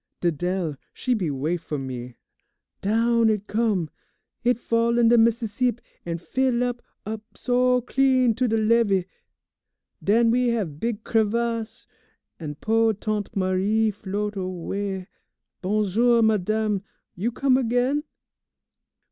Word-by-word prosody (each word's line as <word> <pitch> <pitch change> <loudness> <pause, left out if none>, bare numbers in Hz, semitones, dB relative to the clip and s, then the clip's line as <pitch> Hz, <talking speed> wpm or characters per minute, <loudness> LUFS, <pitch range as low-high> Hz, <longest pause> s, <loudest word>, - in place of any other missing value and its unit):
Didele, 175 -1 -1 0.2
she 255 - 0
be 190 -9 -1
wait 155 +5 -2
fo' 155 -2 -4
me. 125 -2 -6 0.7
Down 230 +3 +2
h'it 210 -2 0
come! 210 -6 0 0.6
H'it 245 0 +3
fall 235 0 +1
in 235 -1 +5
de 240 - +6
Meesseesip, 230 +1 +1 0.3
an' 170 0 -2
fill 250 +6 0
up 245 -1 -2 0.2
up 215 +1 -4
so, 250 0 +2
clean 255 -1 +3
to 250 +3 0
de 225 0 +1
levee, 215 -4 +3 1.0
den 230 +3 +4
we 250 +1 +2
have 200 -11 -1
big 230 0 -2
crivasse, 230 +1 -1 0.5
an' 150 -3 -5
po' 225 +6 +2
Tante 210 0 -3
Marie 195 +3 +1
float 205 +1 -4
away. 190 +1 -4 0.6
Bon 210 +3 +1
jour, 230 +4 +3
madame, 215 -1 +1 0.3
you 215 +7 -2
come 265 +2 +2
again? 255 +3 +1
220 Hz, 125 wpm, -24 LUFS, 190-235 Hz, 1.0 s, de